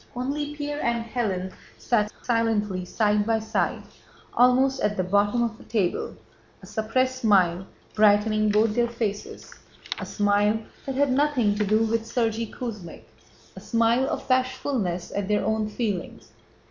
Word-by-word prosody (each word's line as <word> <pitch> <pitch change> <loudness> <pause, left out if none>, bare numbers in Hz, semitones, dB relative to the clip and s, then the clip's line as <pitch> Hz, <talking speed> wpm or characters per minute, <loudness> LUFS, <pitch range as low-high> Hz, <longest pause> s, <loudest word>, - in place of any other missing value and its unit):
Only 290 +4 -3
Pierre 290 0 -4
and 235 -1 0
Hélène 195 -6 -2 0.2
sat 215 -4 0
silently 215 -6 0
side 210 +1 +1
by 225 +1 +1
side 220 0 -1 0.5
almost 260 +2 +3
at 210 0 0
the 185 - +1
bottom 205 +5 +2
of 230 -1 -3
the - - -13
table, 200 -6 -1 0.5
a - - -9
suppressed 255 +4 -1
smile 190 -4 +3 0.3
brightening 215 0 +3
both 210 +1 +3
their 240 +1 +2
faces, 220 -4 -5 0.5
a - - -4
smile 205 +1 +2 0.3
that 270 - -3
had 280 0 +2
nothing 260 -6 +2
to 210 +1 0
do 215 +2 +2
with 225 0 0
Sergéy 225 -2 -1
Kuzmích—a 210 -9 -10
smile 230 +3 +1
of - - -4
bashfulness 255 -8 -1
at 200 -1 -3
their 210 -1 +1
own 220 0 0
feelings. 210 -5 -4
220 Hz, 145 wpm, -25 LUFS, 205-245 Hz, 0.5 s, almost